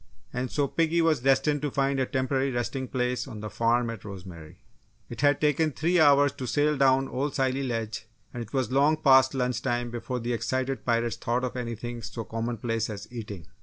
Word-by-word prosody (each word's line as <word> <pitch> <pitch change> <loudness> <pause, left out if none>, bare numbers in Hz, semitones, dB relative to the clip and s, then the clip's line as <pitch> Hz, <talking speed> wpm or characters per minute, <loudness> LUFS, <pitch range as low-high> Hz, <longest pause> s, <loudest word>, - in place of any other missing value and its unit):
And 125 +1 -2
so 145 +2 0
piggy 165 +3 +1
was 160 -3 +3
destined 135 +3 +2
to 150 - -1
find 135 0 0
a 130 - +1
temporary 130 0 0
resting 130 +1 -2
place 125 0 -1
on 110 -5 -8
the 105 -1 -6
farm 115 +2 +1
at 115 -4 -9
Rosemary. 90 -6 -10 0.5
It - - -6
had 145 -1 +4
taken 155 +1 +2
three 170 +5 +1
hours 145 -2 +6
to 130 - -4
sail 150 +2 +2
down 135 -1 +4
to - - -9
Old 140 +2 -2
Scilly 135 0 +1
Ledge 115 -4 -3 0.3
and 120 - -5
it 115 - -8
was 130 -4 -1
long 145 +4 +4
past 135 -3 +5
lunch 125 -1 -1
time 120 0 -1
before 120 +1 -4
the 120 +1 -2
excited 130 +3 -2
pirates 115 -1 +1
thought 120 +2 -1
of 125 - -3
anything 120 -1 -5
so 110 +2 -6
commonplace 115 0 -2
as 105 -2 -7
eating! 105 -8 -7
125 Hz, 205 wpm, -27 LUFS, 115-140 Hz, 0.5 s, hours